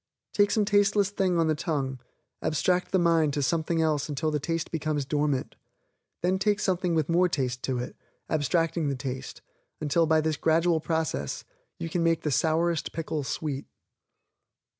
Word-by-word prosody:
Take 205 -1 +4
some 210 0 +2
tasteless 205 -1 +3
thing 190 -3 +1
on 165 - +3
the 160 - +2
tongue, 140 -4 -2 0.4
abstract 180 +4 +1
the 190 - +3
mind 165 -4 +3
to 145 - 0
something 160 +4 +1
else 155 -2 0
until 155 +2 -1
the 150 - 0
taste 165 +2 -2
becomes 155 -3 -1
dormant. 145 -1 -1 0.7
Then 185 +2 +2
take 205 +1 +2
something 180 -2 0
with 155 -3 +1
more 180 +2 +3
taste 130 -5 -2
to 130 -2 -1
it, 125 - -5 0.3
abstracting 165 +1 +1
the 140 - -1
taste, 130 0 -6 0.4
until 160 +2 +2
by 160 0 +4
this 155 -1 0
gradual 165 +1 +3
process 160 0 -2 0.3
you - - -4
can 170 +1 -1
make 165 -1 +2
the 150 - 0
sourest 165 +3 +1
pickle 160 -2 -3
sweet. 140 0 -3
160 Hz, 165 wpm, -27 LUFS, 150-175 Hz, 0.7 s, Take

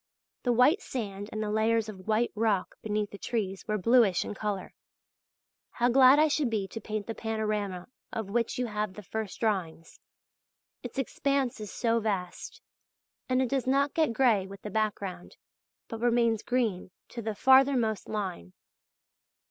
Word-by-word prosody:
The 245 - +1
white 255 - +4
sand 205 - -5
and 215 0 -3
the 210 - -2
layers 220 +1 +2
of 190 -3 -10
white 220 +2 +2
rock 215 -3 0
beneath 210 -1 -2
the 200 - -9
trees 195 -5 -3
were 215 -1 0
bluish 215 -2 +4
in - - -5
colour. 205 -2 -4 1.0
How 245 +1 +2
glad 260 +2 +7
I 310 +1 +5
should 295 -3 +1
be 210 -4 -1
to 225 - -7
paint 215 -1 -4
the 225 - -4
panorama 210 -5 -3 0.2
of 220 -3 -4
which 230 +1 0
you 250 - 0
have 210 -3 -3
the 210 - -10
first 220 +1 -5
drawings. 180 -7 -2 0.8
Its - - -8
expanse 275 -1 0
is 210 -1 -6
so 230 -1 +1
vast! 195 -5 -4 0.7
And 255 0 +3
it 255 - -2
does 265 -1 -1
not 280 +2 +2
get 315 -6 +2
grey 230 -4 +3
in 195 - -8
the 210 - -6
background, 200 -4 -3 0.5
but 225 -1 -7
remains 235 -2 +2
green 225 -8 -1 0.2
to 235 - -6
the 220 -1 -3
farthermost 260 -3 +4
line. 185 - -4
220 Hz, 165 wpm, -29 LUFS, 205-245 Hz, 1.0 s, glad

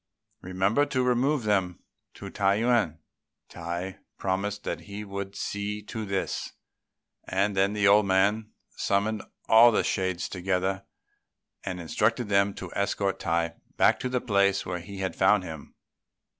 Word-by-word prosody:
Remember 95 +10 +1
to 130 -1 0
remove 125 +2 +1
them 95 -4 0 0.3
to - - -8
Tung 100 0 +2
yüan." 115 -8 +2 0.5
Tai 85 +2 -5 0.2
promised 100 +2 -2
he 105 +1 -5
would 100 -1 -6
see 105 +1 -4
to 110 +1 -5
this; 95 -1 -3 0.7
and 100 +2 0
then 95 +2 +2
the 105 -1 +2
old 105 0 +5
man 100 +3 +2 0.3
summoned 105 +2 0 0.3
all 115 +2 +8
the - - +2
shades 95 -2 -1
together 95 +1 -2 0.8
and 95 -2 -4
instructed 105 +8 0
them 100 0 +2
to 95 -2 -7
escort 100 0 -1
Tai 85 -3 0 0.2
back - - +4
to 125 - -2
the 125 0 0
place 100 -3 +2
where 90 0 -3
they 100 +3 -10
had 95 -1 -3
found 95 +1 +4
him. 80 -4 -9
100 Hz, 145 wpm, -27 LUFS, 95-105 Hz, 0.8 s, all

